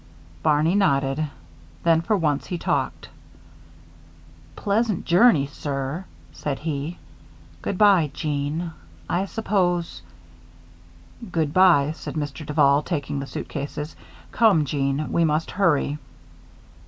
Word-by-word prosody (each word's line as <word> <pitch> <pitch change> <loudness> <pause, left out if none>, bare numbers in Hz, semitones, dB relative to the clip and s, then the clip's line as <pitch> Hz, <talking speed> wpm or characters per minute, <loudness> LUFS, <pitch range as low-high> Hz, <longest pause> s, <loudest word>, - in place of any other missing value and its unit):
Barney 155 - +3
nodded. 140 -5 +2 0.6
Then, 165 -1 +4
for 210 +5 +1
once, 150 -5 0
he 180 - -3
talked. - - -2 1.5
"Pleasant 210 -1 0
journey, 175 - +5
sir," 140 +3 -4 0.3
said 140 -2 -4
he. 155 +2 -4 0.6
"Good 190 - -3
by, 195 -7 +5
Jeanne. 150 +3 -3 0.3
I 180 +3 0
suppose 185 -5 -1 0.7
" 85 - -17
"Good 155 -3 0
by," 170 -6 +5
said 160 - -7
Mr. 150 0 -4
Duval, 145 -1 +3
taking 145 -3 -3
the 135 - -5
suitcases. 150 +3 -5 0.4
"Come, 205 -10 +4
Jeanne, 140 +1 -1
we 170 - +2
must 155 0 0
hurry." 150 -6 +1
155 Hz, 110 wpm, -24 LUFS, 140-175 Hz, 1.5 s, journey